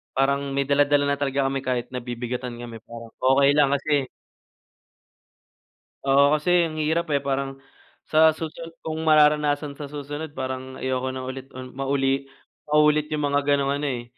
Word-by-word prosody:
parang 140 +1 0
may 140 - +2
dala-dala 145 +1 +3
na 140 - -1
talaga 140 -1 0
kami 135 - -1
kahit 125 -2 -3
nabibigatan 125 0 -5
kami 120 -1 -8
parang 115 -1 -10
okey 135 +2 +4
lang 145 -1 +3
kasi 140 -1 0 2.0
Oo, 140 +2 +4
kasi 175 +2 +2
ang 155 - -8
hirap, 160 +3 0
eh, 140 - +2
parang 135 0 -3 0.4
sa 160 0 +4
susunod 165 +1 -7
kung 160 0 -3
mararanasan 150 -2 +3
sa 145 - -6
susunod 145 +2 -6
parang 130 0 -5
ayoko 130 0 -2
nang 130 0 -5
ulit, 130 +1 -7 0.3
mauli 135 0 0 0.4
maulit 150 0 +4
yung 150 -1 -1
mga 140 - +3 0.2
ganong 140 -1 0
ano, 145 - -2
eh, 125 -3 -3
140 Hz, 150 wpm, -24 LUFS, 130-150 Hz, 2.0 s, okey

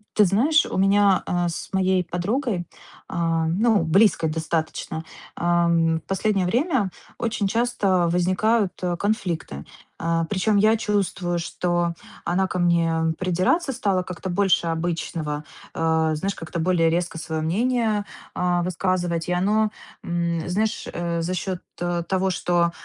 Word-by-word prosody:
Ты 210 - +6
знаешь, 275 - +3
у - - -4
меня, 195 0 +4
а, 175 -1 0
с 165 - -6
моей 190 -1 +2
подругой, 180 - -2 0.4
а, 165 -1 0
ну, 205 +2 +2
близкой 170 -1 +3
достаточно, 160 0 -3 0.3
ам, 170 -1 +2
в - - -8
последнее 195 0 +1
время 245 - +1 0.3
очень 225 -3 -1
часто 200 -5 +1
возникают, 185 +4 +2
э, 175 -1 0
конфликты. 175 - -2 0.4
А, 165 0 +1
причём 205 +4 +1
я 215 +2 +4
чувствую, 200 -5 -1
что 175 0 -1 0.3
она 185 +2 +1
ко 180 - -3
мне 165 -2 +2
придираться 185 - +1
стала 200 -7 0
как-то 185 +1 -6
больше 185 -1 +2
обычного, 165 -2 -2 0.3
а, 160 -1 +1
знаешь, 195 +6 -2
как-то 165 +1 -5
более 165 -1 +3
резко 175 0 -1
своё 160 0 -3
мнение, 215 +4 +1 0.3
а, 180 -1 +1
высказывать. 175 -2 -1
И - - +1
оно, 210 +4 +2 0.3
м, 170 -1 -1
знаешь, 215 +4 -1
э, 170 -1 -2
за 170 +2 -2
счёт 185 0 -3 0.5
того, 190 0 +1
что, 175 -2 +1
180 Hz, 135 wpm, -23 LUFS, 170-200 Hz, 0.5 s, Ты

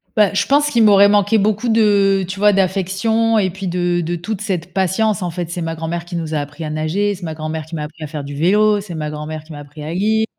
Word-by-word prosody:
Bah, 210 -3 +3
je 195 - +1
pense 290 +1 +3
qu'il 235 -5 +3
m'aurait 200 -1 +7
manqué 205 +1 +3
beaucoup 215 +3 0
de 200 -3 +3
tu 190 +2 -6
vois? 210 +1 +5
D'affection 195 +4 +1
et 195 -3 +2
puis 190 +2 -6
de 175 0 0
de 170 +1 -2
toute 195 +4 -5
cette 180 -5 -3
patience. 200 +3 +1
En 180 - -2
fait, 170 0 -5
c'est 175 +1 -4
ma 165 0 -3
grand-mère 165 +1 -4
qui 175 0 -7
nous 160 -2 -3
a 155 - 0
appris 145 +3 -7
à 155 - -4
nager, 160 +7 -1
c'est 180 - -13
ma 160 -2 -4
grand-mère 155 0 -4
qui 160 +2 -8
m'a 150 - -3
appris 155 +1 -9
à - - -4
faire 150 -1 -6
du 140 +1 -7
vélo, 205 +6 +3
c'est 190 -4 -8
ma 155 -1 -3
grand-mère 150 +1 -6
qui 160 - -15
m'a 150 - -8
appris 145 +1 -11
à 155 +2 -5
lire, 220 +4 +1
180 Hz, 270 wpm, -18 LUFS, 160-205 Hz, -, m'aurait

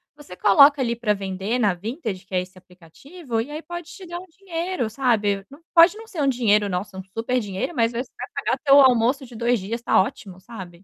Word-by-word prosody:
você 285 -11 -12
coloca 280 +10 +6
ali 235 -2 0
pra 230 -3 0
vender 195 +4 -3
na 205 -6 +2
Vintage, 210 - -5
que 190 - -16
é 180 - +2
esse 185 +1 -12
aplicativo, 225 - -8
e 240 +6 -4
aí 305 +1 -5
pode 345 0 -8
te 360 +1 -11
dar 345 +1 -6
um 365 - -11
dinheiro, 350 - -4
sabe, 210 -5 0
nã 280 - -13
pode 340 +3 +7
não 450 0 -11
ser 355 -8 -5
um - - +2
dinheiro 215 -5 +2
"Nossa, 190 +1 -4
um 190 - -6
superdinheiro", 225 - -3
mas 230 -1 +1
aí 235 +2 -2
você 265 - -24
vai - - -6 0.2
pagar - - 0
teu 280 0 +8
almoço 255 +1 +3
de 240 -1 -14
2 235 +1 +1
dias, 230 +5 -5
tá - - +4
ótimo, 190 -1 -6
sabe? 185 -5 -11
235 Hz, 225 wpm, -23 LUFS, 195-285 Hz, 0.2 s, teu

